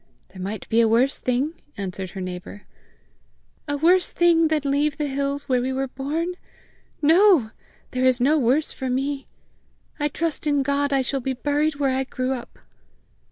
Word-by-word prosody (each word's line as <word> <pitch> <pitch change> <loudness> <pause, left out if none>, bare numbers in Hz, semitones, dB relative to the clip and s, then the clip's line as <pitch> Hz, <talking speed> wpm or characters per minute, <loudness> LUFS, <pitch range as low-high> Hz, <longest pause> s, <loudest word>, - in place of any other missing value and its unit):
"There 185 0 -11
might 200 +2 -5
be 230 +1 +3
a 230 - +4
worse 240 +5 +2
thing!" 255 +5 0 0.2
answered 190 -1 -4
her 190 - -7
neighbour. 185 +2 -7 1.0
"A 290 0 -1
worse 355 +5 +3
thing 335 -2 +4
than 310 -1 +1
leave 285 +1 +1
the 300 - -1
hills 280 0 -2
where 255 -2 +2
we 260 +1 -1
were 265 +1 -1
born? 310 +7 -3 0.7
No! 325 - +5 0.4
There 255 0 0
is 255 -1 +3
no 275 +5 +3
worse 270 +5 +2
for 260 -2 -4
me! 275 +2 -2 0.7
I 295 - +1
trust 320 +1 -3
in 285 -2 +2
God 280 +1 0
I 270 -1 +2
shall 270 +1 -2
be 265 +2 -2
buried 290 +3 0
where 275 -2 0
I 265 0 -1
grew 255 0 -2
up!" 245 -2 -8
275 Hz, 175 wpm, -23 LUFS, 250-295 Hz, 1.0 s, No